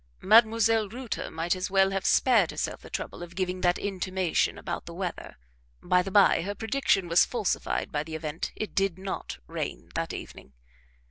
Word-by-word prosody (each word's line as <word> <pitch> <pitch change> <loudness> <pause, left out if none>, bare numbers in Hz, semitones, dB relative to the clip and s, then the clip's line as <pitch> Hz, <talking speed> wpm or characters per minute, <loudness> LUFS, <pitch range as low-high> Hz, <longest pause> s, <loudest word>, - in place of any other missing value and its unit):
Mdlle. 225 0 +4
Reuter 245 0 -5
might 165 +3 -1
as 185 0 -3
well 195 0 +3
have 195 0 -1
spared 225 -9 +4
herself - - -4
the - - -12
trouble - - -5
of 175 0 -9
giving 185 -1 -2
that 175 0 +3
intimation 185 -3 -1
about - - -5
the - - -8
weather - - -5 0.5
(by 180 0 +3
the 185 - -5
by 200 -2 +5
her 200 +4 -4
prediction 225 -5 +1
was 170 +1 +5
falsified 225 -6 -1
by 150 - -1
the 160 +1 -6
event 155 0 -4
it 215 - -5
did 195 -3 +1
not 190 - -5
rain - - -5
that - - -2
evening). 65 - -9
190 Hz, 180 wpm, -27 LUFS, 175-210 Hz, 0.5 s, by